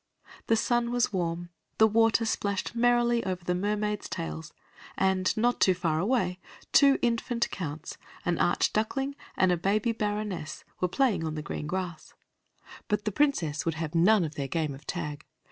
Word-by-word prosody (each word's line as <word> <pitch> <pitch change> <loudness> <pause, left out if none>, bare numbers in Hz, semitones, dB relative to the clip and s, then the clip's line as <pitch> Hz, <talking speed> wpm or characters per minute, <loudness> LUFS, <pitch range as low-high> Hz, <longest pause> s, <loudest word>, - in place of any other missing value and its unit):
The 225 - +4
sun 240 +1 +1
was 240 -3 +1
warm, 175 -1 -2 0.3
the 220 - +7
water 225 +1 +3
splashed 200 -2 -1
merrily 240 0 +3
over 185 -2 -3
the 180 - 0
mermaids' 210 +2 -1
tails, 80 0 -5 0.5
and 190 -1 +2
not 240 +2 +2
far 170 -4 +2
away 190 -3 0 0.3
two 275 -1 +6
infant 235 0 +1
counts, 160 -3 -6 0.3
an 175 -1 0
archduckling, 220 +9 +1 0.2
and 185 -1 +4
a 175 - +2
baby 205 +6 +1
baroness 205 -7 -3 0.2
were 180 - +2
playing 235 -3 +1
on 155 -1 -3
the 155 - -4
green 150 - -5
grass, 180 -2 -5 0.7
but 210 -1 -1
the 210 - 0
Princess 185 - +1
would 165 -1 -1
have 160 -1 -4
none 185 +4 +5
of 155 - -5
their 140 -2 -3
game 155 0 -1
of 140 +2 -13
tag. 150 -4 -4
190 Hz, 160 wpm, -28 LUFS, 165-225 Hz, 0.7 s, the